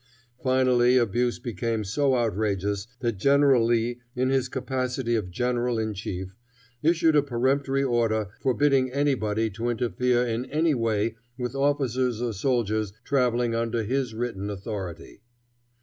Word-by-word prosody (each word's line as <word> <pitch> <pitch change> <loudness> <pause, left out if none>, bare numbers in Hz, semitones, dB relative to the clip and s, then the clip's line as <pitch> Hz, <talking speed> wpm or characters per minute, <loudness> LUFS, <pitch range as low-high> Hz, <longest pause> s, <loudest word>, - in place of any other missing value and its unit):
Finally 130 -1 +3
the 125 - +5
abuse 120 +3 0
became 115 0 -3
so 130 +7 +1
outrageous 105 -3 -1
that 115 -6 -1
General 140 -1 +4
Lee, 120 +1 +1 0.2
in 130 +1 +1
his 130 -2 +1
capacity 130 -2 -2
of 105 -5 -2
general 120 +4 -1
in 110 -1 -1
chief, 95 -1 -6 0.5
issued 165 0 +3
a 145 - +6
peremptory 135 +1 0
order 115 -5 +1
forbidding 135 0 +2
anybody 115 -6 0
to 115 +5 -3
interfere 120 +2 +1
in 120 +1 -2
any 155 +1 +1
way 115 -2 0 0.2
with 125 -1 -3
officers 130 -4 0
or 120 -2 -2
soldiers 110 -2 0
traveling 125 -3 +1
under 115 0 -1
his 125 0 -1
written 110 -4 -3
authority. 100 -2 -6
120 Hz, 135 wpm, -26 LUFS, 110-130 Hz, 0.5 s, a